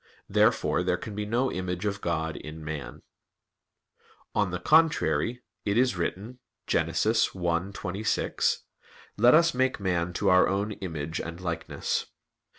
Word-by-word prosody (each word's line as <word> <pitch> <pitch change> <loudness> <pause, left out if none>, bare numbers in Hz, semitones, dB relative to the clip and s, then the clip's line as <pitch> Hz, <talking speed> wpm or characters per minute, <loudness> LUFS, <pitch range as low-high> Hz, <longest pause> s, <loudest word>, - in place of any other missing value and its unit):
Therefore - - +2
there 90 0 +1
can 105 +4 -7
be 105 0 -4
no 120 +4 +1
image 90 +1 -3
of 100 -1 -2
God 80 -2 -1
in 75 0 -8
man. 75 -2 -6 1.3
On 105 -2 +1
the 90 - -2
contrary, 150 - +2 0.2
It 100 +1 0
is 125 -3 +3
written 100 +8 -4 0.3
(Gen. 80 - +1
1:26): 90 +1 0 0.6
"Let 120 +6 +6
Us 165 +1 +5
make 130 0 +1
man 90 -3 0
to - - -1
Our 90 0 +6
own 100 +2 -1
image 80 -6 -4
and 85 +1 -7
likeness." 85 -2 -2
95 Hz, 135 wpm, -27 LUFS, 85-110 Hz, 1.3 s, Let